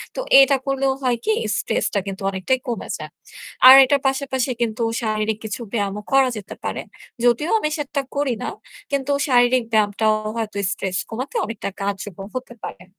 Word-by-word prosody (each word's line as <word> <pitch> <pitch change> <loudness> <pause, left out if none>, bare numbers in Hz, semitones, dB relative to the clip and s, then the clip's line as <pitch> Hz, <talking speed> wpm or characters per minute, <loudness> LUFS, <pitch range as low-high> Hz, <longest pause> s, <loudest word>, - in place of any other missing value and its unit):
তো - - -4 0.2
এটা 275 +1 +5
করলেও 275 -1 +1
হয় 250 -3 +1
কি? 440 - +3 0.2
stress - - -1
টা 200 - +2
কিন্তু 195 0 -6
অনেকটাই 195 +7 -1
কমে 235 - -4
যায়। - - -8 0.6
আর 260 - +13
এটার 280 +1 +1
পাশাপাশি 265 -1 -1
কিন্তু 230 0 -1 0.2
শারীরিক 215 -1 -1
কিছু 215 +3 -5
ব্যায়ামও 205 -2 -2
করা 270 -1 +5
যেতে 205 -2 -8
পারে। - - -3 0.4
যদিও 245 +7 +2
আমি 305 - -1
সেটা 285 -1 -2
করি 280 -3 0
না, - - -2 0.4
কিন্তু 280 0 -1 0.2
শারীরিক 245 -1 +3
ব্যায়ামটাও 215 0 +2 0.2
হয়তো 215 -3 -3
stress 185 -2 -3
কমাতে 255 +5 -6
অনেকটা 220 -2 -5
কার্যকর 195 -1 -4
হতে 255 -1 -5
পারে। 180 - -8
240 Hz, 165 wpm, -21 LUFS, 210-270 Hz, 0.6 s, আর